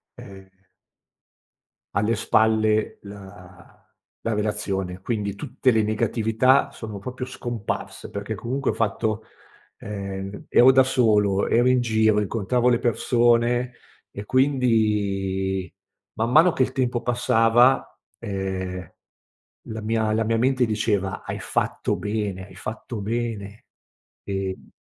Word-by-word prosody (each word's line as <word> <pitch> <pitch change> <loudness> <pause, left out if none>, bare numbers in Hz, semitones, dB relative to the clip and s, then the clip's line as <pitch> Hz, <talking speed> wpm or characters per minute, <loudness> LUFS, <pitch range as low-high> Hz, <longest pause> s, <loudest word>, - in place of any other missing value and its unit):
ehm 95 -1 -12 1.5
alle 105 +3 +2
spalle 110 0 +2
la 95 -3 -13 0.5
la 115 - -1
relazione, 100 -3 -2
quindi 100 0 -2
tutte 130 +5 0
le 110 -2 +3
negatività 110 +4 +2
sono 105 -3 -7
proprio 125 +5 -6
scomparse, 120 -4 -5
perché 100 +2 -5
comunque 130 +7 -2
ho - - -5
fatto 110 0 -1 0.5
ehm, 100 -1 -6
ero 130 +2 +7
da 130 0 +6
solo, 105 -6 +2
ero 120 +2 +3
in 130 0 +4
giro, 110 -3 +2
incontravo 115 +4 0
le 120 -1 +3
persone, 120 0 +2 0.4
e 100 - -7
quindi 105 -8 +1 0.4
man 115 +2 0
mano 165 +5 +7
che 135 - +1
il 130 - -3
tempo 125 -3 0
passava, 120 +1 +3 0.2
ehm, 95 -3 -4 0.8
la 110 0 -5
mia 110 0 0
la 110 +1 +1
mia 115 +1 +1
mente 130 +1 +2
diceva: 105 -3 -1
"Hai - - -5
fatto - - -1
bene, 105 -3 -3
hai 95 - -15
fatto 110 +5 -6
bene". 110 -1 -4 0.6
Ehm 95 -1 -4
110 Hz, 120 wpm, -24 LUFS, 100-120 Hz, 1.5 s, ero